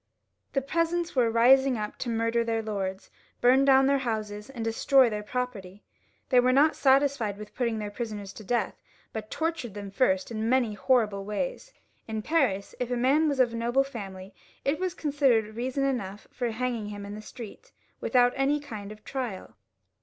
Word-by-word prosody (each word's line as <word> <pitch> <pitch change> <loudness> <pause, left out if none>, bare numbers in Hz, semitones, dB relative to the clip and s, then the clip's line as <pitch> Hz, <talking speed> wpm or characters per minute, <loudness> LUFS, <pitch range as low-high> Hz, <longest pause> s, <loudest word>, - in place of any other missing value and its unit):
The 275 - 0
peasants 335 +3 -1
were 245 -3 +3
rising 255 +3 +5
up 210 -1 -5
to 245 - -3
murder 230 +1 +1
their 225 -1 -1
lords, 195 -3 -4 0.3
bum 260 +3 +5
down 270 -1 +6
their 275 0 +3
houses, 215 -3 -4
and 240 -4 -5
destroy 245 +2 +4
their 210 0 -3
property. 210 -4 -5 0.5
They 255 - +5
were 250 +1 +4
not 290 +4 +4
satisfied 270 -6 +2
with 210 0 -10
putting 235 -3 -1
their 210 -1 -4
prisoners 205 -3 -5
to 215 - -10
death, 240 +4 -1 0.3
but 215 -1 -5
tortured 320 - -3
them 200 -1 -6
first 190 -2 +1
in 220 0 -2
many 250 -4 +2
horrible 210 -3 +1
ways. - - -4 0.4
In 220 -1 -3
Paris, 250 -12 +1
if 250 -1 -2
a 245 - -1
man 285 +6 +3
was 280 -2 -2
of 245 -2 +3
noble 240 +3 +1
family 195 -7 -8 0.3
it 280 +3 +1
was 370 -1 -2
considered 265 - +1
reason 260 +3 -2
enough 210 -7 -3
for 245 -2 -2
hanging 230 -1 -2
him 205 -1 -7
in 200 - -7
the 210 - -7
streets 240 - -11 0.3
without 245 -1 +3
any 275 +2 +2
kind 215 -8 -8
of 215 0 -12
trial. 245 -8 -5
235 Hz, 180 wpm, -27 LUFS, 210-270 Hz, 0.5 s, down